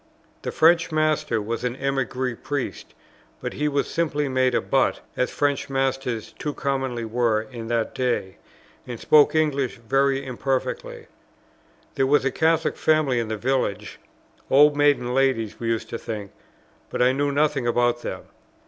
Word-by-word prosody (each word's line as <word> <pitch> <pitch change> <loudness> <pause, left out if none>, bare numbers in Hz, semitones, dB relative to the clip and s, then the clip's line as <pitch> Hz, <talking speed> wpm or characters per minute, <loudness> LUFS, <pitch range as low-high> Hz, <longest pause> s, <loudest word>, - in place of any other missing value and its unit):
The - - -4
French 165 +1 +4
master 155 -7 +1
was 115 +3 -4
an 125 0 -1
émigré 130 -2 -2
Priest, 145 -2 -4 0.4
but - - -5
he 150 +2 -1
was 145 -1 0
simply 150 -3 -1
made 130 -1 +1
a - - +4
butt, - - +1
as 125 - 0
French 145 -1 -1
masters 135 -4 -2
too 150 -1 -3
commonly 135 -4 -2
were 115 -1 +1
in 115 0 -8
that 115 -1 -1
day, 120 -8 -2 0.5
and 120 -2 -6
spoke 150 0 +5
English 140 -5 +1
very 135 +3 +1
imperfectly. 130 +1 -3 0.9
There 135 - +1
was 145 0 +3
a 135 - +2
Catholic 160 +2 +1
family 155 -6 +2
in 115 - -2
the 110 0 -3
village, 105 -4 -2 0.5
old 145 +2 +6
maiden 145 -4 +2
ladies 125 -5 +1
we 115 - -3
used 115 -1 -2
to 115 - -4
think; 105 -3 -6 0.6
but - - 0
I 125 - +5
knew 140 +2 0
nothing 145 -3 +1
about 120 0 +1
them. - - -5
130 Hz, 155 wpm, -24 LUFS, 120-145 Hz, 0.9 s, old